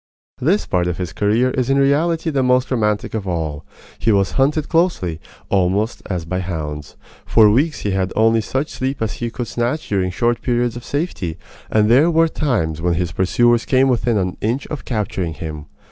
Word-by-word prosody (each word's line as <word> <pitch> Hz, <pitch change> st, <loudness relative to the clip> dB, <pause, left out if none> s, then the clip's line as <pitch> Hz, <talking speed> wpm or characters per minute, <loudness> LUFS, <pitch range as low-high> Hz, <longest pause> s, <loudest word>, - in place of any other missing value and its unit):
This 180 Hz, +11 st, +1 dB
part 90 Hz, -1 st, 0 dB
of 90 Hz, -, -2 dB
his 90 Hz, -3 st, -4 dB
career 115 Hz, +5 st, +2 dB
is 130 Hz, -1 st, -1 dB
in 135 Hz, -, +3 dB
reality 160 Hz, +4 st, +2 dB
the 140 Hz, -2 st, +1 dB
most 125 Hz, 0 st, +2 dB
romantic 105 Hz, -4 st, 0 dB
of 105 Hz, -3 st, -3 dB
all. 80 Hz, -4 st, -3 dB, 0.4 s
He 115 Hz, -, +2 dB
was 100 Hz, -2 st, +2 dB
hunted 145 Hz, +3 st, +1 dB
closely, 165 Hz, -, 0 dB, 0.3 s
almost 100 Hz, +3 st, +1 dB
as 90 Hz, -4 st, -3 dB
by 90 Hz, +3 st, -2 dB
hounds. 75 Hz, -5 st, -5 dB, 0.3 s
For 110 Hz, -2 st, +5 dB
weeks 145 Hz, +7 st, +1 dB
he 105 Hz, -, -1 dB
had 95 Hz, -1 st, -1 dB
only 115 Hz, +1 st, +3 dB
such 135 Hz, +8 st, -2 dB
sleep 130 Hz, +1 st, -3 dB
as 110 Hz, -, -2 dB
he 120 Hz, -, -1 dB
could 120 Hz, +1 st, -4 dB
snatch 120 Hz, +7 st, -2 dB
during 95 Hz, -3 st, 0 dB
short 120 Hz, +6 st, 0 dB
periods 120 Hz, -1 st, 0 dB
of 120 Hz, -, -7 dB
safety, 140 Hz, -, -3 dB, 0.3 s
and 105 Hz, -1 st, +3 dB
there 135 Hz, +9 st, +5 dB
were 165 Hz, 0 st, +4 dB
times 80 Hz, -, -1 dB
when 85 Hz, 0 st, +1 dB
his 85 Hz, 0 st, -1 dB
pursuers 120 Hz, +7 st, +2 dB
came 135 Hz, 0 st, +3 dB
within 120 Hz, -2 st, +1 dB
an 90 Hz, -2 st, -2 dB
inch 120 Hz, +6 st, -1 dB
of 150 Hz, -, -6 dB
capturing 95 Hz, -8 st, -2 dB
him. 75 Hz, -2 st, -7 dB
110 Hz, 190 wpm, -19 LUFS, 90-130 Hz, 0.4 s, For